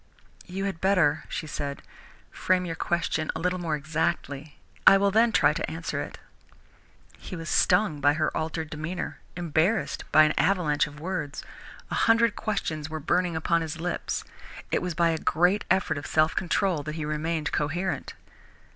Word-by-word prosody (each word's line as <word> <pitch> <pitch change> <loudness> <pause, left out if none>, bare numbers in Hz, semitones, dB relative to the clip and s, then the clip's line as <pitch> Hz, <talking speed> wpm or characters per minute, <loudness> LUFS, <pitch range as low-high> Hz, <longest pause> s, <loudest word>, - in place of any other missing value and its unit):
"You 195 +2 -3
had 195 -5 -4
better," 180 -6 +3
she - - -4
said, 145 -2 -5 0.5
"frame 185 0 +1
your 165 - -3
question 165 -2 -1
a - - -3
little 180 +2 0
more 165 -3 -1
exactly. 150 -1 -2 0.3
I 195 - +10
will 200 0 +2
then 225 +3 +4
try - - +4
to - - -3
answer - - -3
it." - - -7 1.0
He 185 - -7
was 165 0 -6
stung 180 -5 +3
by 145 +1 +5
her 155 0 -1
altered 160 0 -3
demeanour, 160 +4 -4 0.2
embarrassed 175 +5 0
by 155 - +8
an 155 - +3
avalanche 170 -7 +2
of 150 0 -11
words. 160 -4 -4 0.5
A - - +1
hundred 230 -1 +4
questions 160 -8 -3
were 155 0 -4
burning 175 +3 +1
upon 165 +1 +1
his 160 0 -5
lips. 175 +1 -2 0.5
It - - +1
was 180 -3 -3
by 170 -1 +3
a 160 - -2
great 180 +7 +2
effort 180 -5 +1
of 145 - -8
self 155 +2 +2
control 180 -2 +1
that 155 +2 -5
he 155 -2 -3
remained 155 +1 -2
coherent. 165 +1 -2
165 Hz, 170 wpm, -27 LUFS, 155-185 Hz, 1.0 s, I